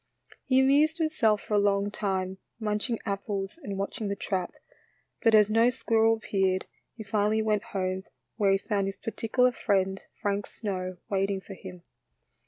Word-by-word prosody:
He 260 -1 +4
amused 290 +5 +4
himself 275 -11 +2
for - - -5
a 205 - +5
long 200 0 +2
time 190 -2 -2 0.2
munch 210 +2 -1
ing 230 - 0
apples 200 - -3
and 200 -7 -5
watching 200 +2 -3
the 200 - -1
trap, 185 -2 -2 0.7
but 225 -1 +5
as 210 -1 +7
no 225 +3 +4
squirrel 225 -2 +2
appeared, 190 -4 0 0.3
he 220 - -6
finally 210 +1 +1
went 215 -1 +1
home, 185 0 -2 0.3
where 205 -3 +3
he 195 - +4
found 200 0 -1
his 195 - -5
particular 250 +3 +1
friend, 195 -4 0 0.2
Frank 200 0 -1
Snow, 185 -4 -4
waiting 195 0 0
for 195 - -10
him. 180 -2 -10
205 Hz, 165 wpm, -28 LUFS, 195-225 Hz, 0.7 s, as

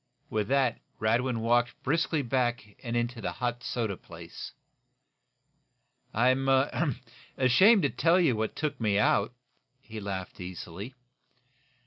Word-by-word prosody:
With 105 -2 0
that 135 -2 +2 0.2
Radwin 115 +2 +1
walked 120 +1 +1
briskly 160 +1 +1
back 120 -4 -1
and 120 0 -2
into 120 0 -2
the - - -3
hot 120 -1 -3
soda 110 -5 -2
place. 85 -1 -10 1.6
"I'm 130 +4 +2 0.9
ashamed 185 - +5
to - - +2
tell 170 +2 +3
you 160 -9 +3
what 110 0 -2
took 150 -4 -3
me 105 -3 +2
out," 105 +1 +3 0.5
he 110 -4 -9
laughed, 95 -3 -5
easily. 90 +6 -7
120 Hz, 120 wpm, -29 LUFS, 105-130 Hz, 1.6 s, ashamed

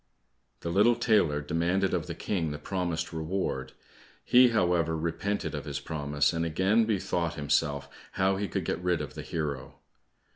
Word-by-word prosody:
The 85 - -3
little 105 +6 +5
tailor 85 -12 +2
demanded 85 +6 0
of - - -1
the - - -5
King 85 -6 -2
the 75 - -4
promised 85 +1 -3
reward; 80 +4 -3 0.5
he, 125 0 +6
however, 85 -7 +1
repented 85 +6 -2
of - - -5
his - - -3
promise, 75 -1 0
and 85 0 -1
again 95 +8 +2
bethought 90 -6 -1
himself 70 -1 0 0.3
how 95 0 +2
he 100 +1 -2
could - - -3
get - - -2
rid 90 -2 +1
of 75 - -5
the - - -6
hero. 70 -5 -4
85 Hz, 160 wpm, -29 LUFS, 75-95 Hz, 0.5 s, he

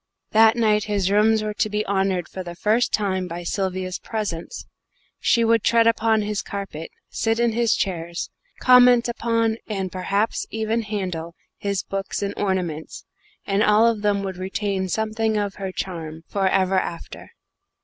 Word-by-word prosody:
That 220 +1 +6
night 215 -3 +2
his 200 -2 0
rooms 215 +1 +4
were 215 0 -2
to 215 - 0
be 210 0 -1
honoured 190 -3 0
for 185 - -7
the 175 -1 -8
first 215 +7 +1
time 190 -3 0
by 175 0 -6
Sylvia's 185 0 -2
presence. 210 - -5 0.5
She 235 - +3
would 230 -1 +3
tread 230 -1 +4
upon 225 -1 +3
his 210 0 -2
carpet, 195 -6 -6 0.2
sit 225 0 0
in 235 -1 +3
his 235 0 +2
chairs, 170 -3 -3 0.3
comment 250 -1 +6
upon, 230 -1 0
and 195 -4 -3
perhaps 200 +4 -1
even 220 +1 -1
handle, 180 -6 -4 0.2
his 200 -1 -1
books 195 +1 -4
and 200 - -2
ornaments 180 -6 -3 0.4
and 195 +1 +1
all 215 +1 +5
of 230 -3 +2
them 205 -1 +1
would 190 -2 -4
retain 190 0 -2
something 220 +2 0
of 205 -1 -1
her 190 -1 -3
charm 165 -4 -5
for 195 -2 +1
ever 190 0 +2
after. 170 -2 -7
205 Hz, 160 wpm, -23 LUFS, 185-220 Hz, 0.5 s, That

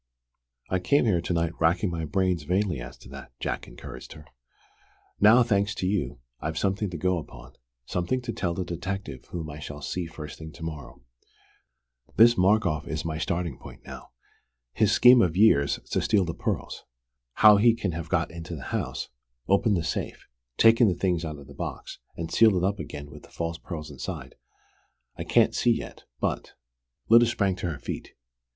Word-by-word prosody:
"I 95 - +2
came 140 +9 +2
here 90 -7 +2
to 85 - -4
night 85 -1 +1
racking 85 +3 +2
my 80 -1 -3
brains 90 +1 0
vainly 90 0 0
as - - -9
to - - -15
that," 70 -2 -11
Jack - - -3
encouraged 65 +1 -10
her. 75 - -13 0.9
"Now, 110 +4 +7
thanks 105 -2 +1
to - - -3
you, 90 -12 -1 0.2
I've 80 +1 -4
something 100 +1 0
to 90 - -6
go 90 +2 +1
upon, 65 -5 -12 0.3
something 90 - -1
to 120 -2 -4
tell 85 -2 -2
the 95 - -3
detective 90 -5 -5
whom 85 -3 -6
I 75 - -9
shall 75 -1 -7
see 85 +4 -3
first 75 -2 -9
thing 80 0 -8
to 80 - -11
morrow. 70 -7 -7 1.1
This 120 +1 +7
Markoff 90 -6 +2
is 80 0 -4
my 80 -1 -3
starting 85 -4 -2
point - - -13
now: - - -10 0.6
his - - +2
scheme 125 0 +7
of 90 -4 +1
years 75 -10 +4
to - - +1
steal 100 -4 +2
the 85 - -3
pearls. - - -4 0.5
How 105 -1 +7
he 115 +2 +5
can 105 -5 -2
have 85 -1 -6
got - - 0
into 85 0 -7
the 70 - -8
house, - - -2 0.4
opened 100 +1 +3
the 85 - -1
safe, 80 - -4 0.3
taken 115 +1 +6
the 90 - +1
things 90 -1 0
out 80 -2 -5
of 70 - -12
the - - -13
box, - - -6 0.2
and 80 -1 -5
sealed 110 -3 +6
it 90 - 0
up 100 +2 0
again 75 0 -7
with - - -11
the - - -17
false 85 0 -4
pearls 80 -3 -7
inside, 65 -3 -6 0.8
I - - -6
can't - - +3
see - - +2
yet, - - -9
but - - -2 0.3
" - - -52
Lyda 115 +1 +7
sprang 100 -5 0
to 90 - -3
her 80 - -4
feet. - - -7
85 Hz, 190 wpm, -26 LUFS, 80-100 Hz, 1.1 s, Now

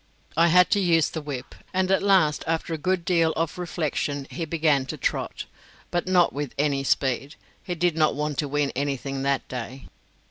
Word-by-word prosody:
I 165 +2 +5
had 180 +1 +5
to 205 - +4
use 165 -5 +3
the 160 - -4
whip, 145 -4 -6 0.2
and 185 0 +1
at 195 - +3
last 190 -7 +3
after 165 0 -1
a - - -1
good 185 +1 0
deal 165 -3 +3
of 165 +2 -2
reflection 150 -5 -2
he 165 - -3
began 150 -4 +1
to - - -5
trot, - - -2 0.5
but 175 0 -1
not 180 -2 +4
with 145 -2 -4
any 140 -1 +1
speed; 135 +2 0 0.3
he 180 - -3
did 175 -1 +1
not 155 -3 +2
want 150 -1 -2
to 150 - 0
win 145 0 0
anything 135 0 -2
that 140 0 0
day. 125 +1 -7
155 Hz, 190 wpm, -25 LUFS, 140-175 Hz, 0.5 s, I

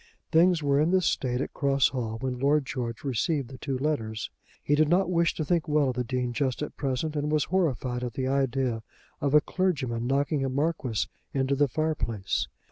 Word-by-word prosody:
Things 170 0 +4
were 140 0 +3
in 155 - +3
this 185 -1 +3
state 125 -1 0
at - - -4
Cross 140 -2 +2
Hall 115 -4 -3
when 130 -2 -2
Lord 145 +2 +3
George 125 -5 -4
received 140 +1 0
the 130 -1 -10
two 135 -2 -2
letters. 115 -7 -2 0.3
He 145 - +1
did 150 0 +4
not 180 +1 +3
wish 170 -1 +2
to 155 - -2
think 170 +1 +1
well 150 -2 +3
of - - -8
the 125 - 0
Dean 125 0 -2
just 130 +3 -1
at - - -6
present, 140 +3 -2
and 150 0 -1
was 155 -1 +3
horrified 130 -9 0
at 120 -2 -3
the 130 - -2
idea 130 -3 0 0.4
of 140 +1 +2
a 150 - +8
clergyman 130 -12 -1
knocking 140 +2 +1
a 135 - 0
Marquis 140 -5 -1 0.3
into 135 0 +1
the 145 +1 +3
fire 155 +4 0
place. 100 - -2
140 Hz, 210 wpm, -27 LUFS, 125-150 Hz, 0.4 s, a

